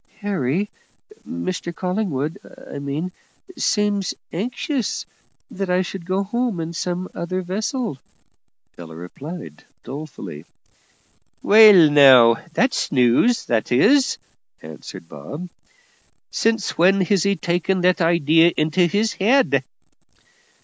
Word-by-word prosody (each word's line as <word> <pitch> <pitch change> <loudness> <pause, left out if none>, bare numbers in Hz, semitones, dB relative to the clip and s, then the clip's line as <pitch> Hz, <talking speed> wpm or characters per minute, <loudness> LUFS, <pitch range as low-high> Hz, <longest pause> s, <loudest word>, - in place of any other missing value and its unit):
"Harry 190 -2 -1 0.6
Mr 185 -9 -4
Collingwood, 180 -6 -3 0.3
I - - -7
mean 145 +6 -4 0.4
seems 205 -3 0 0.2
anxious 245 - -3 0.5
that 195 -1 -4
I 180 +1 +2
should 180 -1 -8
go 190 +2 0
home 235 -1 -2
in 165 +1 -5
some 180 +2 -3
other 185 +2 -4
vessel," 210 - -3 0.8
Ella 80 -2 -10
replied, 90 - -9 0.2
dolefully. 130 - -8 1.0
"Well, 205 -7 +7
now, 130 -5 +7
that's 240 +8 0
news, 130 - +2
that 115 0 -1
is," 255 - +3 0.5
answered 80 +1 -10
Bob. 145 - -8 0.8
"Since 225 -7 -1
when 190 +3 +4
has 185 +1 +1
he 200 +2 +1
taken 180 +1 -1
that 180 0 +2
idee 165 -1 +4
into 170 +2 +1
his 205 +4 0
head?" 250 +9 +2
180 Hz, 110 wpm, -21 LUFS, 145-205 Hz, 1.0 s, Well